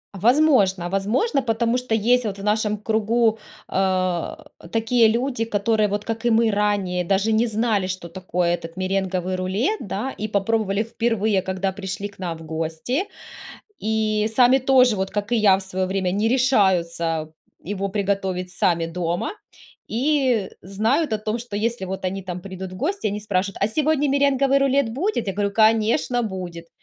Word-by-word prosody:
Возможно 205 - +3
возможно, 225 - +1
потому 230 0 0
что 250 -2 -3
есть 245 +3 +3
вот 200 -2 -3
в - - -7
нашем 210 0 +1
кругу, 220 +1 +1 0.3
э, 185 -2 0 0.4
такие 225 +1 +3
люди, 240 +1 -1
которые 215 0 +1
вот, 205 +1 -3
как 225 +1 -4
и - - +4
мы 225 0 +3
ранее, 200 -3 0
даже 195 +4 +1
не 225 +2 +3
знали, 215 -3 0
что 185 -2 -5
такое 180 0 -1
этот 165 0 -10
меренговый 185 -1 -1
рулет, 195 - -1
да 220 +5 -3
и 215 - -5
попробовали 205 0 0
впервые, 225 -3 0
когда 190 +1 -2
пришли 190 +1 -5
к 200 - -18
нам 175 -3 -4
в 160 - -12
гости, 160 - -2 0.8
и 215 0 0
сами 250 +2 +5
тоже 255 -3 +4
вот, 190 -1 -2
как 205 +1 -3
и - - +4
я 205 -4 +5
в - - -6
свое 190 0 -2
время, 190 -1 -1
не 205 +4 +1
решаются 170 -10 +1 0.3
его 195 +1 -3
приготовить 195 -2 -2
сами 170 -2 +1
дома 170 +1 -2 0.6
и 255 -4 +1
знают 225 - 0
о - - +1
том, 215 +2 -3
что 230 -3 -5
если 230 -1 -1
вот 190 0 -5
они 195 +1 -2
там 180 -1 -6
придут 190 0 -7
в - - -8
гости, 325 - -1
они 205 0 -3
спрашивают: 200 -1 -2
"А 200 - +2
сегодня 295 +4 +1
меренговый 275 0 +3
рулет 275 -3 +2
будет?" 295 - -1
Я 195 - -1
говорю: 200 0 -1
"Конечно, 225 +4 +2
будет". 180 -5 -6
210 Hz, 170 wpm, -22 LUFS, 190-235 Hz, 0.8 s, сами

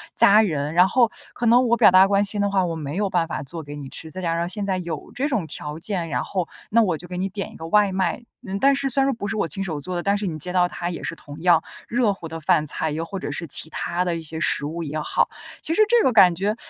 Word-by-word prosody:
家 210 +2 +7
人。 150 -7 -1
然 180 +2 +5
后 235 +2 +3 0.2
可 240 - -3
能 240 +2 +5
我 235 +1 +3
表 - - +7
达 185 +1 +7
关 200 0 +2
心 205 0 0
的 200 - +1
话， 195 -2 +1
我 170 -1 -3
没 150 -2 -5
有 200 +1 0
办 175 -3 +1
法 160 - -4
做 160 +4 -7
给 145 0 -8
你 140 -2 -8
吃。 160 - -7
再 185 +4 -7
加 165 -2 -1
上 170 +1 -1
现 200 +2 -2
在 190 -2 0
有 165 -4 -6
这 275 +3 -1
种 235 - -1
条 150 0 -7
件， 170 -1 -3
然 - - -1
后 185 -4 -3 0.2
那 230 +2 +4
我 180 -7 +1
就 175 - -11
给 180 - -6
你 185 +2 -1
点 195 +1 -5
一 - - -15
个 160 - -8
外 205 +3 +3
卖。 190 +5 -1 0.2
嗯， 195 +1 -4
但 275 +3 +4
是 275 0 -1
虽 270 +2 +1
然 270 - +2
说 - - +1
不 205 - -5
是 215 - -3
我 200 - 0
亲 195 +6 -4
手 160 -6 -4
做 180 +5 -5
的， 175 - -2
但 200 +1 +2
是 205 -1 -3
你 160 -3 -4
接 180 +3 -4
到 180 -1 +3
它 175 0 -4
也 175 - -6
是 - - -4
同 145 -2 -11
样 175 -2 +4 0.2
热 230 -3 +1
乎 175 -4 -9
的 165 0 -7
饭 155 -2 +2
菜， 155 +1 -1
又 160 +2 -3
或 195 - -6
者 145 - -5
是 165 +3 -5
其 155 - 0
他 175 +2 -2
的 175 -2 -1
一 - - -6
些 160 0 -8
食 150 - 0
物 165 +3 -4
也 155 0 -4
好。 150 - 0 0.3
其 320 - -2
实 385 - +3
这 475 +1 +4
个 260 - +4
感 190 -6 +6
觉 200 +4 -1
180 Hz, 325 characters per minute, -23 LUFS, 165-205 Hz, 0.3 s, 家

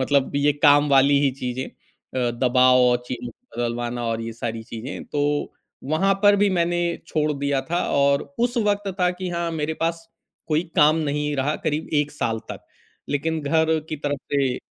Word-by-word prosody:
मतलब 140 0 +1
ये 145 +1 +3
काम 145 0 +6
वाली 140 0 +5
ही 140 -2 +3
चीज़ें 125 +1 -3
अ, 125 -2 -5
दबाव 125 +1 +4
और 125 -1 +4
चिन्ह 120 -1 -5 0.3
बदलवाना 120 0 -2
और 115 0 -1
ये 115 0 -5
सारी 115 -1 -5
चीज़ें। 115 +4 -7
तो 145 0 -1 0.4
वहाँ 195 +5 +3
पर 205 0 +6
भी 205 0 +3
मैंने 175 -1 +1 0.3
छोड़ 155 -1 0
दिया 140 -1 -1
था 175 +1 +1 0.2
और 140 0 +3 0.2
उस 240 +1 0
वक़्त 205 0 0
था 180 0 +3
कि 185 - -3
हाँ 170 -1 -2
मेरे 155 +2 -1
पास 165 0 -2 0.4
कोई 155 +2 +2
काम 150 +1 +5
नहीं 150 0 -1
रहा 140 +3 0
करीब 155 +1 -1
1 150 - -8
साल 115 -6 -2
तक, - - -8 0.4
लेक़िन 160 +3 -1
घर 160 +2 +2
की 155 - -3
तरफ़ 145 -1 -3
से 135 -3 +1
145 Hz, 180 wpm, -23 LUFS, 125-160 Hz, 0.4 s, काम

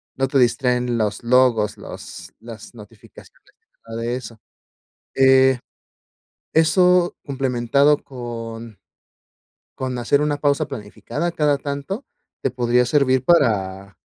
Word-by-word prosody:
no 135 - 0
te 135 +1 0
distraen 125 -1 +1
los 105 0 -2
logos, 120 -4 +2
los - - -10
las 115 0 -11
notificaciones, 105 -1 -17 0.3
nada 115 0 -6
de 120 +1 -2
eso, 115 -3 -9 0.8
eh, 130 -1 +5 0.9
eso 175 +2 +3
complementado 135 +1 +1
con 115 -3 -8 1.0
con 130 -1 -3
hacer 140 +4 +1
una 150 -1 0
pausa 145 +1 0
planificada 140 +7 -5
cada 150 -3 +1
tanto, 145 - -5 0.4
te 135 - -1
podría 125 0 +1
servir 130 -1 +2
para 100 - +1
125 Hz, 110 wpm, -21 LUFS, 115-140 Hz, 1.0 s, eh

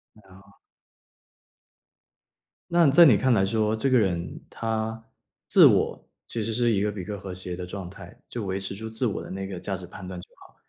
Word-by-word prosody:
哎 110 - -19
哦。 100 +1 -18 2.2
那 170 -1 +4
你 140 - +5
在 170 +4 +8
你 125 - +7
看 130 -2 +2
来 95 -3 +3
说， 110 +1 0
这 135 +5 0
个 130 - +4
人 85 -5 -2
他 110 0 -3 0.5
自 - - +7
我 - - +2 0.2
其 115 - -4
实 115 - -3
是 120 +1 +2
一 100 -2 +1
个 105 0 0
比 95 -3 -7
较 105 -1 -5
和 95 -1 -7
谐 90 -1 -6
的 90 - -6
状 90 0 -7
态， 90 -2 -13
就 115 -4 -5
维 95 +1 -2
持 95 0 -5
住 110 +2 -7
自 110 +3 -2
我 105 - -2
的 - - -9
那 95 +1 -5
个 95 -2 -6
价 95 0 -3
值 90 - -9
判 90 +1 -10
断 90 -1 -7
就 - - -12
好， - - -17
100 Hz, 235 characters per minute, -26 LUFS, 95-110 Hz, 2.2 s, 在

